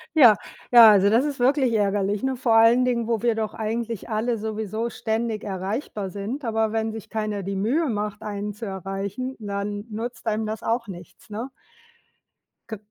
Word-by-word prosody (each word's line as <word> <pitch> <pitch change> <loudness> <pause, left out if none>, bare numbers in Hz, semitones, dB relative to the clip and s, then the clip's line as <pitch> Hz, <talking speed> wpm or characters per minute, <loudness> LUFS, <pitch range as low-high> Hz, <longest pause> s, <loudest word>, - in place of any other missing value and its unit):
Ja, 245 -9 +8 0.4
ja, 230 -2 +11
also, 200 -1 +5
das 230 +5 +4
ist 285 -3 -3
wirklich 260 0 +3
ärgerlich, 205 -1 +1
ne? 265 0 -1
Vor 235 -2 +1
allen 230 +3 +6
Dingen, 240 -2 0
wo 230 -3 0
wir 240 -1 +2
doch 220 -1 -3
eigentlich 225 0 -4
alle 230 +2 0
sowieso 220 +1 -3
ständig 220 -1 -2
erreichbar 200 +1 -4
sind. 205 +9 -5
Aber 220 -2 0
wenn 220 0 0
sich 220 -1 -9
keiner 215 -2 -3
die 195 +1 -3
Mühe 250 +12 +1
macht, 210 -3 -3
einen 205 0 -4
zu 225 +3 -7
erreichen, 195 +6 -4
dann 205 0 -4
nutzt 225 +1 -6
einem 220 0 0
das 215 0 -5
auch 230 0 -1
nichts, 175 +1 -11
ne? 225 +5 -5 1.2
Kö 220 - -4
220 Hz, 175 wpm, -24 LUFS, 205-235 Hz, 1.2 s, ja